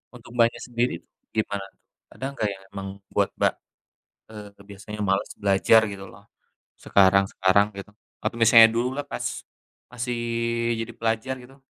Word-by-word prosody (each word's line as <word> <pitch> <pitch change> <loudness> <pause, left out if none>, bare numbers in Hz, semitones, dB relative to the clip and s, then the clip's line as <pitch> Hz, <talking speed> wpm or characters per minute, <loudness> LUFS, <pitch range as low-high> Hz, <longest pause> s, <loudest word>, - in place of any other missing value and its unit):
Untuk 120 -1 -14
Mbaknya 115 -1 +3
sendiri 120 -2 0 0.4
gimana 100 -2 -1
tuh, - - -44 0.3
ada 130 - -6
enggak 110 -6 -1
yang 95 0 -14
emang 95 0 -5 0.3
buat - - +2
Mbak, - - +2 0.8
eee, 100 -2 -11
biasanya 105 +1 -9
males 95 - 0
belajar 100 +3 +5
gitu 95 0 -8
loh, - - -16 0.6
sekarang-sekarang 95 0 +4
gitu, 100 +1 -9 0.3
atau - - -2
misalnya 115 0 +8
dululah, 125 +4 -1
pas - - -5 0.7
masih 120 0 -3 0.6
jadi 115 +1 -4
pelajar 115 +4 -1
gitu? 135 +2 -17
110 Hz, 140 wpm, -25 LUFS, 100-120 Hz, 0.8 s, misalnya